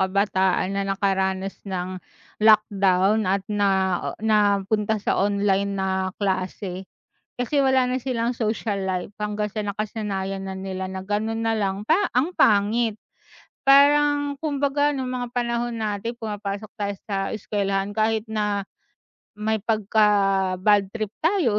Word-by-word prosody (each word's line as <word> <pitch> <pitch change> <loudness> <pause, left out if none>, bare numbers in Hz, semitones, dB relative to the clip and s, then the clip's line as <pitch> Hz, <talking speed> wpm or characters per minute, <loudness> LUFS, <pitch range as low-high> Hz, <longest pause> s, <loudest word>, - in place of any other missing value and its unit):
kabataan 190 -1 +1
na 200 0 -1
nakaranas 195 -1 0 0.2
ng 185 0 -4 0.4
lockdown 205 -1 +4
at 195 0 0
nao 190 -3 +1
napunta 210 0 +2
sa 205 - 0
online 200 0 +1
na 190 0 -1
klase. 185 -1 -3 0.5
Kasi 275 +3 +1
wala 260 -1 +3
na 255 -1 -2
silang 245 -2 -1
social 215 -3 -2
life 185 +1 -3
hanggang 210 0 -2
sa 215 -1 -3
nakasanayan 200 -2 -3
na 190 0 -5
nila 190 -1 -4
na 190 - -5
ganun 215 +3 -2
na 225 0 0
lang, 200 0 -2
pa 320 - +5 0.2
ang 295 +9 0
pangit. 215 +1 +3 0.7
Parang 285 +1 +5
kumbaga 290 -1 0
nung 260 -2 -3
mga 245 -1 -4
panahon 240 0 -1
natin 220 +1 -3
pumapasok 210 -2 -5
tayo 205 -1 -2 0.2
sa 200 - 0 0.2
eskwelahan 200 -1 -1
kahit 220 +1 +1
na, 210 -2 -1 0.7
may 215 +1 -1
pagka-badtrip 205 -1 +2
tayo 320 - +2
210 Hz, 125 wpm, -24 LUFS, 195-225 Hz, 0.7 s, pa